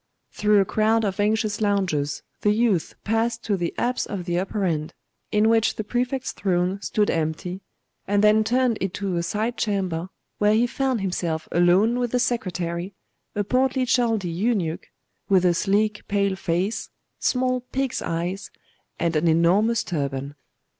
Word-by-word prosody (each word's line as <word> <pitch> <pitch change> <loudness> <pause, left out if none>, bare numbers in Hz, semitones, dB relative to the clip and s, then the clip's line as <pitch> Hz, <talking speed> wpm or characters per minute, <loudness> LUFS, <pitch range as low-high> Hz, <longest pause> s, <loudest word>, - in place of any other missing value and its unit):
Through 210 -1 +3
a 195 - +3
crowd 220 +2 +2
of 195 0 -2
anxious 215 0 +1
loungers 185 -9 0 0.2
the 210 - +2
youth 215 -6 +1
passed 225 +1 0
to 210 - 0
the 175 -3 -2
apse 245 +1 0
of 190 -4 -5
the 175 0 0
upper 195 +2 -2
end, 155 -3 -2 0.4
in 210 0 +3
which 225 0 +3
the 215 - -3
Prefect's 250 +4 -2
throne 185 0 -1
stood 210 0 +1
empty, 165 +4 -2 0.5
and 205 +1 +2
then 215 +1 +5
turned 245 0 +1
into 195 0 -2
aside 215 +7 -1
chamber, 185 -5 -1 0.3
where 210 +1 +4
he 230 +2 +4
found 260 -2 -1
himself 170 -4 -2
alone 185 +8 +3
with 245 -1 0
the 250 - +3
secretary, 185 -6 -2 0.4
a 205 - +1
portly 255 +4 +1
Chaldee 230 -6 +1
eunuch, 180 -3 -1 0.4
with 185 -2 +4
a 175 - +4
sleek 210 +3 0
pale 200 -2 +1
face, 185 +5 -2 0.3
small 255 0 +1
pig's 265 -1 -1
eyes, 175 +4 -3 0.5
and 170 -1 0
an 155 +2 +2
enormous 185 +8 +3
turban. 140 -4 -3
205 Hz, 155 wpm, -24 LUFS, 175-225 Hz, 0.5 s, then